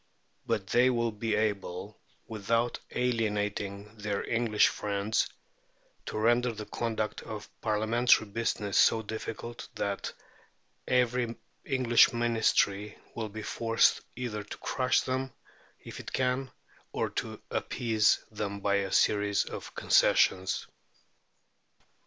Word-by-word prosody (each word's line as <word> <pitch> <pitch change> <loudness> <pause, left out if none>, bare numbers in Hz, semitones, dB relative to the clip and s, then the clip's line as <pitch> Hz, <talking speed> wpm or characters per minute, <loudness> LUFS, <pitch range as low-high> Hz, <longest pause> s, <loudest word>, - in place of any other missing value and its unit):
But 95 - 0
they 125 +6 +4
will 120 -2 +1
be 105 0 -1
able, 105 -2 -2 0.3
without 115 +2 -1
alienating 105 -3 -2
their 105 -1 -2
English 115 -2 +3
friends, 105 +1 -1 0.8
to - - -4
render 120 +3 +3
the 110 -1 -7
conduct 110 -2 -2
of 110 -2 -7
Parliamentary 110 +2 +3
business 105 -1 -1
so 110 0 +5
difficult 110 +2 -6
that 100 -1 -2 0.8
every 125 -2 +1 0.3
English 125 -4 +4
Ministry 110 -3 +1 0.2
will 110 -2 -3
be 110 +1 -7
forced 115 0 +2
either 115 -4 -4
to 105 - -9
crush 130 -1 +1
them, 130 0 -2 0.5
if - - -8
it - - -8
can, 130 +1 0 0.4
or - - -1
to - - -4
appease 110 -3 +1
them 100 -1 -4
by 100 0 +2
a 100 -1 -2
series 100 -1 +3
of - - -8
concessions. 95 0 +3
110 Hz, 115 wpm, -30 LUFS, 105-120 Hz, 0.8 s, so